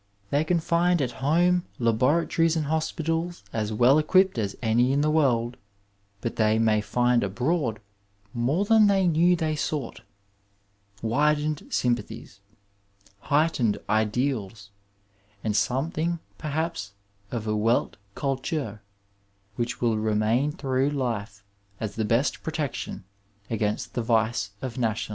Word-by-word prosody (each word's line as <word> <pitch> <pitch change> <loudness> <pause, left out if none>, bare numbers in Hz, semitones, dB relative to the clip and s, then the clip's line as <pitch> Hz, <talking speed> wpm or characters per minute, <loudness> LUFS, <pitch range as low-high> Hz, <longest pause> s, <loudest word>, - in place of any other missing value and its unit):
They 145 +2 +2
can 170 +2 +1
find 175 +2 +2
at 130 -4 0
home 175 +5 +3
laboratories 150 +8 +2
and 155 -2 0
hospitals 165 +1 -2
as 110 -1 -2
weU 125 +7 +5
equipped 185 -1 +3
as 100 -2 -2
any 120 +2 +2
in 140 +1 +2
the 155 +1 +2
world, 125 -6 +1 0.6
but 115 - -4
they 110 0 +3
may 110 -1 +3
find 120 +3 +2
abroad 120 - -1 0.5
more 135 +11 +1
than 220 0 +5
they 195 -2 +3
knew 175 +1 +4
they 160 -2 -1
sought 145 -3 -3 0.5
— 100 0 -34
^widened 150 +5 0
sympathies, 115 -4 -2 0.8
heightened 140 -5 +1
ideals 110 -2 -1 0.7
and 105 -2 -1
something 155 +8 0 0.2
perhaps 155 -9 -3 0.4
of 115 -3 -4
a 110 - -1
Wdt 110 +3 +1 0.2
cuUur 135 -4 -2 0.8
which 120 +1 -3
will 115 -3 +1
remain 110 +6 +1
through 135 -3 0
life 115 -7 -3 0.4
as 105 -2 -4
the 110 0 -1
best 115 +6 +1
protection 155 -9 -4 0.5
against 105 -2 -2
the 120 - -1
vice 110 -2 +1
of 130 -1 -4
nationalism. 110 -3 -1
125 Hz, 125 wpm, -26 LUFS, 110-155 Hz, 0.8 s, weU